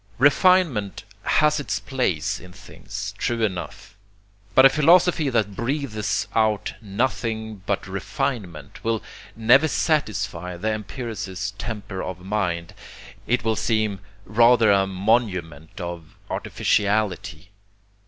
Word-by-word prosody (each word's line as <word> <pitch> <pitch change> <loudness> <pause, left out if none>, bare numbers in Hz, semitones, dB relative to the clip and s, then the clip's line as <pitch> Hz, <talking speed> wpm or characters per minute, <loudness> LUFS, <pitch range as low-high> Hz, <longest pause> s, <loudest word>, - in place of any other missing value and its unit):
Refinement 145 - +3 0.2
has 150 0 +3
its 145 - -2
place 125 - -1
in 90 +1 -13
things, 95 +2 -8
true 115 -1 0
enough. 100 +2 -4 0.6
But 130 - +8
a - - +10
philosophy 160 +1 +4
that 110 -5 0
breathes 115 -5 -2
out 110 -2 +1
nothing 110 -1 -2
but 100 - -1
refinement 100 - -4
will 115 -1 -1 0.3
never 120 +7 +5
satisfy 110 - -1
the 110 +5 -1
empiricist 105 -3 -5
temper 105 -4 -5
of 95 -1 -5
mind. 90 -5 -2 0.5
It 125 +1 +1
will 110 -1 +1
seem 110 -3 0 0.3
rather 115 -1 +5
a 100 -1 +3
monument 95 -5 -1
of 85 -3 -7 0.2
artificiality. 100 -1 -1
110 Hz, 110 wpm, -23 LUFS, 95-120 Hz, 0.6 s, a